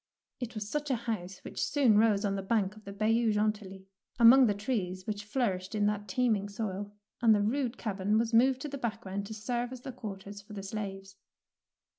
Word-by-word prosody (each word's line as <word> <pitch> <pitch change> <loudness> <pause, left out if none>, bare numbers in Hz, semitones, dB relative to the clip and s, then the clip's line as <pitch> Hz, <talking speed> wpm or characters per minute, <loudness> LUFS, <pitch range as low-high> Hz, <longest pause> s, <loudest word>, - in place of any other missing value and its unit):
It 245 -1 -5
was 210 -1 -4
such 295 +5 -2
a 260 - +2
house 215 -6 -4
which - - -4
soon 265 -7 +3
rose 215 -2 +3
on 200 - +1
the 195 - -2
bank 200 0 0
of 215 - -16
the 200 - -6
Bayou 220 +3 +2
Grentilly, 210 -2 -1 0.3
among 245 +2 +8
the 205 - +1
trees 195 -4 -2
which 205 -1 -3
flourished 205 -3 -1
in 205 -1 +2
that 210 0 -1
teeming 210 -1 +1
soil, 205 -1 -4 0.3
and 225 -2 +6
the 205 - +2
rude 245 +2 0
cabin 205 -1 0
was 230 +1 0
moved 260 +4 +4
into - - -3
the 280 0 -6
background 200 -3 -3
to 220 - -7
serve 240 +3 -2
as 255 -1 -8
the 265 - -6
quarters 205 -4 -8
for 210 +1 -13
the 200 -2 -6
slaves. 195 -1 -6
215 Hz, 205 wpm, -31 LUFS, 200-235 Hz, 0.3 s, among